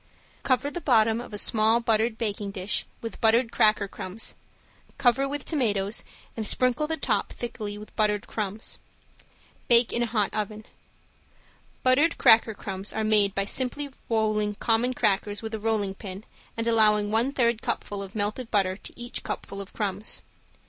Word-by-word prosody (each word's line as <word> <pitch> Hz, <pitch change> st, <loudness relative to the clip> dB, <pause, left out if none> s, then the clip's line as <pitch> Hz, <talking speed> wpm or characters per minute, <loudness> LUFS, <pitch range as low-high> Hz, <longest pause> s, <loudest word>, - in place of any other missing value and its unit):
Cover 265 Hz, +2 st, +1 dB
the 350 Hz, -, -5 dB
bottom 225 Hz, -4 st, +3 dB
of 245 Hz, -, -10 dB
a 210 Hz, -, -5 dB
small 220 Hz, +2 st, +4 dB
buttered 225 Hz, -1 st, +1 dB
baking 205 Hz, -3 st, -3 dB
dish 195 Hz, 0 st, -2 dB
with 230 Hz, -, -7 dB
buttered 230 Hz, +1 st, +4 dB
cracker 215 Hz, -1 st, +3 dB
crumbs, 190 Hz, +2 st, -4 dB, 0.6 s
cover 265 Hz, +2 st, +3 dB
with 290 Hz, -1 st, -3 dB
tomatoes 210 Hz, -, 0 dB, 0.3 s
and 220 Hz, -2 st, -3 dB
sprinkle 255 Hz, +4 st, +2 dB
the 320 Hz, 0 st, -2 dB
top -, -, 0 dB
thickly 215 Hz, -4 st, -5 dB
with 210 Hz, +1 st, -12 dB
buttered 210 Hz, -1 st, +1 dB
crumbs. 210 Hz, 0 st, -3 dB, 0.9 s
Bake 235 Hz, -1 st, +5 dB
in 240 Hz, -, 0 dB
a 240 Hz, -, +1 dB
hot 215 Hz, -3 st, 0 dB
oven. 215 Hz, 0 st, -4 dB, 1.2 s
Buttered 280 Hz, +6 st, +4 dB
cracker 220 Hz, -1 st, +6 dB
crumbs 195 Hz, 0 st, -4 dB
are 220 Hz, -, -2 dB
made 210 Hz, -2 st, +3 dB
by 195 Hz, -, 0 dB
simply 260 Hz, +6 st, -2 dB, 0.2 s
rolling 215 Hz, -2 st, +1 dB
common 240 Hz, +4 st, +1 dB
crackers 205 Hz, -1 st, 0 dB
with 220 Hz, 0 st, -5 dB
a 220 Hz, -, -2 dB
rolling 210 Hz, -3 st, 0 dB
pin 195 Hz, 0 st, -8 dB, 0.3 s
and 230 Hz, -, -1 dB
allowing 210 Hz, -2 st, +4 dB
one 230 Hz, +5 st, +2 dB
third 235 Hz, -4 st, +1 dB
cupful 205 Hz, -1 st, -3 dB
of 195 Hz, +1 st, -8 dB
melted 215 Hz, +4 st, -2 dB
butter 190 Hz, -3 st, +1 dB
to 205 Hz, -, -10 dB
each 240 Hz, 0 st, -4 dB
cupful 200 Hz, 0 st, -5 dB
of 195 Hz, -, -10 dB
crumbs. 205 Hz, 0 st, -3 dB
220 Hz, 160 wpm, -26 LUFS, 205-235 Hz, 1.2 s, cracker